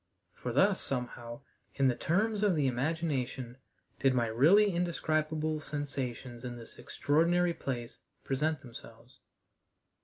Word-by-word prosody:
For 125 - -5
thus, 190 - +3
somehow, 120 -1 -4 0.3
in 135 - +3
the 130 - +3
terms 210 - +1
of 205 -4 +3
the 150 -3 +1
imagination, 130 -2 -1 0.4
did 135 -1 +3
my 120 -2 +2
really 165 - +5
indescribable 155 -2 0
sensations 135 -5 -5
in 125 -1 -5
this 115 -1 -11
extraordinary 170 +4 +2
place 120 -6 -5 0.2
present 150 +2 0
themselves. 120 -1 -12
140 Hz, 120 wpm, -31 LUFS, 125-165 Hz, 0.4 s, really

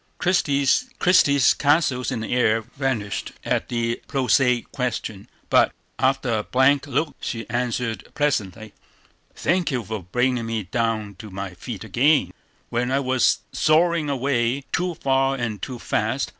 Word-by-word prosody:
Christie's 160 - +3
castles 140 -4 +2
in 125 -4 -3
the 110 - -3
air 115 -2 +3
vanished 120 -3 -3
at - - -1
the 115 0 -1
prosaic 125 -2 +2
question; 115 -6 -4 0.2
but, - - +4 0.3
after 130 -4 +1
a - - -3
blank 135 +4 +2
look, 150 +2 -1
she 115 -1 -4
answered 120 -1 -2
pleasantly: 110 -7 -1 0.6
"Thank 175 +1 +1
you 125 -5 -1
for 110 0 -5
bringing 125 +5 0
me 115 -2 -2
down 110 -1 -2
to 110 -2 -9
my 95 -1 -6
feet 110 +4 -7
again, 130 +9 +2 0.4
when 120 +1 -1
I 135 - +2
was 130 -2 +2
soaring 160 0 +2
away 130 -1 0
too 180 0 -1
far 135 -1 +1
and 115 -6 -4
too 125 +1 -5
fast. - - -1
125 Hz, 140 wpm, -23 LUFS, 115-140 Hz, 0.6 s, but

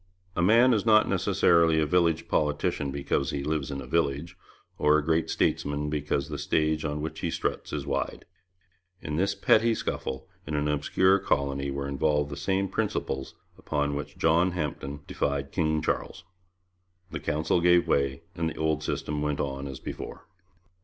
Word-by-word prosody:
A - - 0
man 115 +7 +6
is 105 - +1
not 110 -1 +5
necessarily 85 -2 +3
a 80 - +2
village 85 -1 +2
politician 75 -1 0
because 70 0 -1
he 70 -1 -3
lives 75 -1 -1
in 70 -1 -4
a - - -8
village, 75 +2 -1 0.4
or 75 +1 +5
a 75 - -1
great 80 0 +1
statesman 75 +1 0
because 75 -2 -1
the 75 -1 -5
stage 80 0 +1
on 75 -1 -2
which 80 - -5
he - - -1
struts - - -3
is 70 -2 -3
wide. 70 -1 -3 0.7
In 75 0 -4
this 100 +3 +1
petty 115 +1 +3
scuffle 65 -9 -4 0.2
in 75 - -2
an 75 0 0
obscure 95 +6 +3
colony 70 -4 0
were 70 0 -3
involved 75 +1 0
the - - -4
same 95 +6 0
principles 65 -6 -3 0.3
on 75 -1 +1
which 70 0 -5
John 85 +3 +3
Hampden 75 -3 -4
defied 70 -1 -2
King 80 -3 0
Charles. 80 - -2 0.9
The - - -4
Council 80 +3 0
gave 90 0 +4
way, 70 +3 +1
and 80 -1 -1
the - - -9
old 80 -1 0
system 75 0 -2
went 75 -1 -1
on 70 0 -3
as 65 -2 -7
before. - - -7
75 Hz, 170 wpm, -27 LUFS, 70-85 Hz, 0.9 s, man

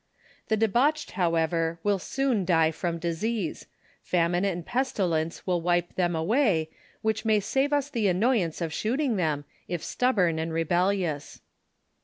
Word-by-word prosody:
The 220 - +1
debauched, 245 +8 +2
however, 165 -2 0
will 205 -2 +2
soon 260 0 0
die 165 -3 +3
from 170 +1 -3
disease; 170 +3 -3 0.3
famine 175 +1 +1
and 175 -4 -1
pestilence 180 -11 -1
will 180 -2 0
wipe 175 0 0
tliem 175 -2 +1
away, 170 - +1 0.3
whicli 220 0 0
may 215 -1 +4
save 270 +8 0
us 290 -1 +1
the 235 -8 0
annoyance 185 -3 +1
of 165 -2 -2
shooting 245 - 0
them, 150 -5 -1 0.2
if 175 -3 -3
stubborn 185 -11 +1
and 165 +1 -2
rebellious. 175 -1 0
180 Hz, 140 wpm, -27 LUFS, 165-220 Hz, 0.3 s, may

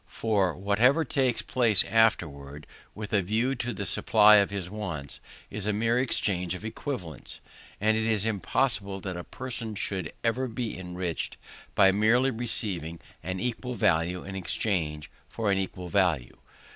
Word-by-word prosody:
For 100 -6 0
whatever 115 - +3
takes 130 -3 0
place 115 -6 +4
afterwards, 75 -10 +1 0.3
with 105 0 -7
a 100 - +4
view 110 +8 0
to 120 -2 -3
the 100 - -4
supply 105 0 +6
of 100 -1 +3
his 100 -3 -4
wants, 90 -9 -6 0.3
is 105 0 -4
a 105 - +2
mere 115 +3 +2
exchange 90 -8 0
of 100 - -8
equivalents; 110 - -6 0.4
and 110 +2 +3
it 110 0 0
is 110 -2 +1
impossible 105 -2 0
that 95 -2 -4
a 90 - -5
person 115 -2 -5
should 95 -5 -3
ever 120 +3 0
be 115 -1 -4
enriched 90 -2 -4 0.4
by 95 -1 +6
merely 115 +6 +3
receiving 100 - -4 0.2
an 95 0 -4
equal 125 +2 -3
value 90 -2 +1
in 95 0 -7
exchange 85 -5 -1 0.2
for 110 -3 -1
an 95 - +2
equal 90 -1 -4
value. 85 -9 +1
100 Hz, 155 wpm, -28 LUFS, 90-115 Hz, 0.4 s, supply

